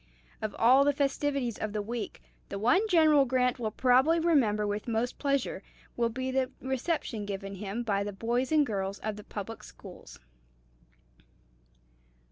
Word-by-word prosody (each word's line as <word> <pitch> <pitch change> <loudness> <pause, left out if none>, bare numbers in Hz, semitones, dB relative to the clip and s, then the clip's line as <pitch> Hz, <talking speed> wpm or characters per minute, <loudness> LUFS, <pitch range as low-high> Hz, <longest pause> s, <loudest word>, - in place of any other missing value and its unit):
Of 215 -2 -3
all 255 +4 +6
the 290 0 +3
festivities 275 -3 -1
of 215 -1 -3
the 210 - -1
week, 230 +1 -5 0.3
the 200 - -4
one 340 - +3
General 315 -6 +5
Grant 250 -1 +1
will 225 -2 -1
probably 260 +8 +3
remember 250 -11 +2
with 205 +2 -3
most 230 +1 -1
pleasure 275 -2 -1 0.3
will 235 -1 +1
be 260 +3 -3
the 260 -1 0
reception 265 -4 -2
given 195 -1 -5
him 200 +4 -4
by 200 -3 0
the 205 - -4
boys 235 +6 -1
and 305 -2 +4
girls 195 -3 -3
of 215 -1 -3
the 210 - -10
public 210 +3 -7
schools. - - -13
240 Hz, 155 wpm, -29 LUFS, 210-275 Hz, 0.3 s, all